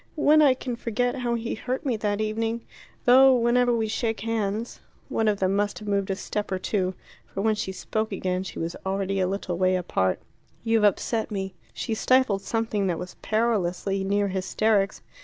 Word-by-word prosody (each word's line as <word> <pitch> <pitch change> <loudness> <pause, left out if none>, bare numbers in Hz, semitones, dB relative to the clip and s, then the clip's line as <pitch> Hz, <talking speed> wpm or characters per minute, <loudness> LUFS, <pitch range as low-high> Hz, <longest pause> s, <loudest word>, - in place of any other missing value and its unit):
When 305 0 +5
I 275 -4 +6
can 250 -1 -4
forget 245 +3 -1
how 240 -2 -1
he 230 0 -3
hurt 255 +6 -4
me 255 -4 +1
that 205 -1 -1
evening. 225 +2 -1 0.4
Though 260 +1 +7
whenever 245 +1 +3
we 225 -2 +1
shake 225 +1 -2
hands 225 0 -2 0.2
" - - -32
One 225 - 0
of 205 -2 +2
them 190 +1 +1
must 205 0 0
have 210 - -9
moved 200 -1 0
a 195 - 0
step 205 +1 -4
or 190 - +1
two, 185 -1 -1 0.3
for 195 - -4
when 220 +1 +3
she 210 -2 -3
spoke 215 +3 -3
again 185 -1 -1
she 190 - -7
was 165 +1 -3
already 195 0 -1
a 185 - +2
little 185 -2 -3
way 185 0 +3
apart. 95 - 0 0.4
"You've 225 -1 +2
upset 220 +3 +1
me." 195 -2 -4 0.2
She 230 - -3
stifled 240 -3 +3
something 220 -2 -1
that 175 -2 0
was 180 +2 -7
perilously 200 -3 0
near 200 +1 +1
hysterics. 195 +2 0
210 Hz, 195 wpm, -26 LUFS, 195-230 Hz, 0.4 s, Though